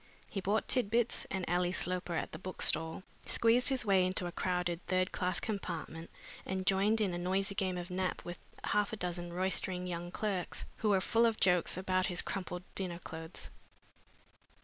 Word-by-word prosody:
He 195 - -4
bought 205 +4 +1
Tit 250 -6 +2
bits 235 +1 +1
and 190 -2 -2
Ally 175 +1 +2
Sloper 180 -1 -1
at - - -2
the - - -7
bookstall, 165 -2 0 0.2
squeezed 235 +3 +5
his 260 -3 +1
way 195 -2 +5
into 185 0 0
a 175 - -3
crowded 180 -1 -1
third 185 0 +1
class 180 -1 0
compartment, 170 -5 -4 0.3
and 190 0 -3
joined 200 +3 +4
in 200 -4 +1
a 175 - -2
noisy 190 +3 0
game 190 -3 -1
of 175 +1 -5
nap 185 0 -2
with 175 0 -6 0.2
half 210 -1 +1
a - - -2
dozen 175 -2 -3
roistering 185 0 0
young 175 -1 -4
clerks, 190 -1 -2
who 215 - +1
were 195 -2 +4
full 230 +4 +4
of 225 -1 -1
jokes 180 -2 +3
about 185 0 +1
his 175 - +2
crumpled 180 -2 -4
dinner 180 -3 -3
clothes. 160 0 -8
185 Hz, 180 wpm, -33 LUFS, 175-195 Hz, 0.3 s, squeezed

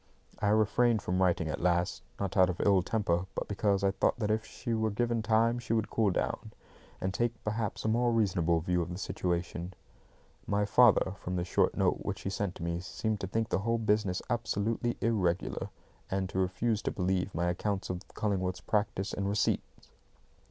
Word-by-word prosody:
I 105 - +1
refrained 110 +1 +3
from 90 +1 0
writing 85 -3 +2
at 80 - -3
last, 90 0 +1 0.2
not 100 -2 -2
out 95 -2 +5
of 90 - -3
ill 100 -2 +4
temper, 95 -3 0
but - - -3
because 100 -1 +1
I 100 - +4
thought - - +1
that 105 -3 0
if 110 +1 +1
she 120 -2 -5
were 110 0 +1
given 115 +2 0
time 115 +2 +2
she 115 -1 -2
would 110 -2 0
cool 110 -3 +2
down, 90 - -2 0.5
and 95 0 -2
take, 120 +3 0
perhaps, 110 0 -2
a - - +2
more 120 +2 +2
reasonable 90 -7 +2
view 90 +1 +1
of 85 - -3
the 90 - -5
situation. 90 -1 -3 0.7
My 100 0 +1
father, 105 -4 +5
from 90 - -4
the 90 - 0
short - - +1
note - - +2
which - - -4
he 95 - -3
sent 100 -2 -3
me, 85 0 -2
seemed 105 +4 -3
to 95 - -3
think 115 +4 -1
the - - +1
whole 115 +3 +1
business 105 -4 +1
absolutely 115 0 -1
irregular, 95 -6 0 0.4
and 95 0 -1
to 95 - -2
refuse 105 +4 0
to - - -1
believe 95 +1 -1
my 85 +1 +1
accounts 95 +2 -2
of 90 -1 -4
Cullingworth's 95 -3 -1
practice 100 0 -1
and 100 0 -1
receipts. 105 +1 -1
100 Hz, 190 wpm, -31 LUFS, 90-110 Hz, 0.7 s, out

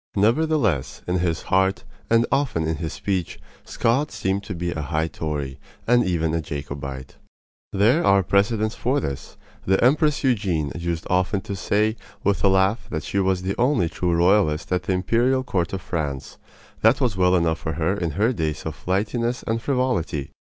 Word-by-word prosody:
Nevertheless, 115 - +1
in 90 0 +1
his 85 -2 -1
heart, 95 +1 +1 0.3
and 115 0 +4
often 135 - +1
in 80 0 -1
his 80 0 -4
speech, 95 -4 -3 0.3
Scott 135 +6 +1
seemed 95 +1 -1
to 100 - -5
be 85 +1 -2
a 80 - -3
high 80 +2 -1
Tory, 75 -5 -4 0.3
and 120 +1 +4
even 80 -3 0
a 80 - 0
Jacobite. 70 -2 -6 0.5
There 115 - +3
are 100 - +4
precedents 110 +3 +1
for 135 +4 0
this. 70 - -6 0.3
The 95 +1 +4
Empress 150 +3 +3
Eugenie 95 - +1
used 85 -1 -3
often 95 +2 +1
to 100 - -5
say 105 +3 +1 0.3
with 100 -5 +1
a - - +6
laugh 95 +4 +2
that 80 -1 -3
she 100 - -1
was 95 -1 +1
the 95 +1 -1
only 125 - +2
true 85 0 -1
royalist 85 -3 +2
at 90 - +1
the 95 - -1
imperial 120 +8 +1
court 95 -9 -1
of 95 -1 -4
France. 70 -6 -4 0.4
That 115 +4 +4
was 125 -7 +1
well 90 -1 +3
enough 80 -2 +1
for 80 - -3
her 80 +5 0
in 85 -6 -2
her 110 +5 +3
days 80 -6 -2
of 80 - -3
flightiness 115 +6 -1
and 115 0 -1
frivolity. 115 - -1
95 Hz, 180 wpm, -23 LUFS, 80-115 Hz, 0.5 s, a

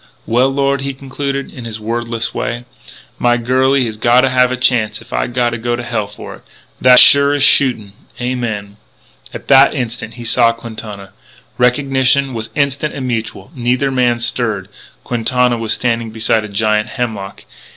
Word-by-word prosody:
"Well, 125 +4 +2
Lord," 140 0 0
he 140 0 -4
concluded, 140 +1 -5
in 125 -3 -9
his 110 -1 -6
wordless 115 +1 -3
way, 120 +1 -4 0.5
"my 120 0 +2
girlie 130 +2 +1
has 110 -2 -5
gotta 120 +4 +3
have 125 0 +2
a 130 - -2
chance 110 -4 +1
if 115 - -14
I - - 0
gotta 120 -1 -1
go 120 +1 -1
to 120 - -6
hell 115 -4 -3
for - - -10
it. - - -23 0.4
That's 125 -1 +7
sure 140 0 +6
as 145 - +1
shootin'.... 115 -7 +3 0.3
Amen." 115 -5 -4 0.5
At - - -9
that 140 +1 +6
instant 115 -3 -5
he 120 - -9
saw 115 0 +3
Quintana. 110 -4 -9 0.5
Recognition 130 +1 +2
was 115 -1 -5
instant 140 +1 -1
and 130 -2 -4
mutual. 115 +2 -4
Neither 125 +1 0
man 125 -2 +1
stirred. 110 -5 -2 0.3
Quintana 125 0 0
was 110 -1 0
standing 115 -2 -1
beside 110 0 0
a - - -9
giant 105 +1 0
hemlock. 110 -6 -5
120 Hz, 165 wpm, -15 LUFS, 115-130 Hz, 0.5 s, That's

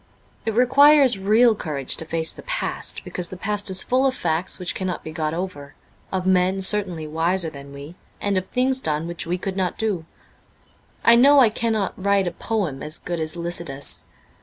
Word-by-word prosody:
It 220 - -1
requires 265 -1 +5
real 220 +4 +4
courage 150 -9 -2
to 160 - -4
face 160 0 -1
the - - -11
past, - - -2
because 180 -1 -4
the 185 - -8
past 205 +1 -1
is 190 0 0
full 260 +2 +2
of 260 - -1
facts 170 -1 -1
which 180 -1 -4
cannot 185 -3 -4
be 160 - -7
got 155 -1 -2
over; 160 -5 -6 0.4
of 185 -1 -2
men 185 +1 +2
certainly 185 -5 +2
wiser 165 +2 0
than 140 -1 -11
we, 140 +3 -10 0.3
and 205 -1 -1
of 185 0 -1
things 260 +1 0
done 155 -8 -2
which 170 -1 -5
we 175 +2 -1
could 190 +1 -5
not 185 -2 -2
do. 200 -7 -2 1.0
I 230 - +8
know 280 +4 +6
I 245 -4 +6
cannot 220 -3 -1
write 200 -1 +2
a 175 - -2
poem 190 -12 -3
as 155 +2 -3
good 175 -1 -5
as 155 +1 -1
'Lycidas.' 150 - -3
185 Hz, 190 wpm, -22 LUFS, 160-215 Hz, 1.0 s, I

